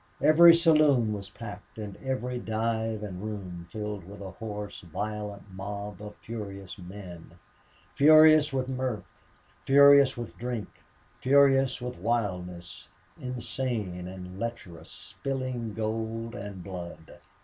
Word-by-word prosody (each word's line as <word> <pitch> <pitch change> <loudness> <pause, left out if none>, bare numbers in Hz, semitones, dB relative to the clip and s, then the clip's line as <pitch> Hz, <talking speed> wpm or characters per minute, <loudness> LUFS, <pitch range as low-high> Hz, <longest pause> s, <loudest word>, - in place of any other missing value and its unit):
Every 170 +2 +9
saloon 155 -9 +4
was 100 -1 -6
packed, 105 -3 -10
and 105 -3 -6
every 125 -2 -3
dive 110 -1 -2
and 95 -3 -6
room 95 -5 -6
filled 105 0 -5
with 100 +4 -11
a 95 -2 -7
hoarse, 105 -1 -6
violent 105 +3 -6
mob 100 +1 -6
of 105 0 -8
furious 100 -4 -8
men: 90 -2 -10 0.6
furious 155 +1 +7
with 130 -1 -1
mirth, 130 -4 -2 0.6
furious 140 -1 +7
with 120 -2 -6
drink, 120 -3 -4 0.5
furious 135 -1 +4
with 125 0 -5
wildness 90 -7 -3 0.3
insane 120 -7 -3
and 90 0 -9
lecherous, 115 -8 -6
spilling 130 -5 -5
gold 115 +1 -3
and 100 -4 -7
blood. 85 -4 -9
110 Hz, 115 wpm, -28 LUFS, 100-130 Hz, 0.6 s, Every